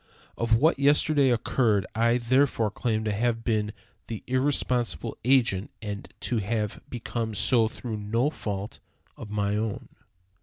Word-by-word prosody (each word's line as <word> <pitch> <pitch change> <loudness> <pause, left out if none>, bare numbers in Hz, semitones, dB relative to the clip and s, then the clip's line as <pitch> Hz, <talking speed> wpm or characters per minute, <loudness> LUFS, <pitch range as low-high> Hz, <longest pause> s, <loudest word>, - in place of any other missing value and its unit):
Of 115 -1 +2
what 145 +5 +3
yesterday 145 0 +4
occurred 115 -4 +2
I 115 +2 +3
therefore 125 -2 +2
claim 110 0 -1
to 110 - -1
have 115 +2 0
been 105 -3 0 0.4
the 110 -3 -6
irresponsible 125 - 0
agent, 120 -6 +3
and 105 -2 -6
to 120 - -1
have 105 0 -2
become 115 -2 -4
so 115 +2 +3
through 110 0 -6
no 115 +7 0
fault 100 -6 -5 0.4
of - - -9
my 105 -1 0
own. 110 -1 -3
115 Hz, 140 wpm, -27 LUFS, 105-125 Hz, 0.4 s, yesterday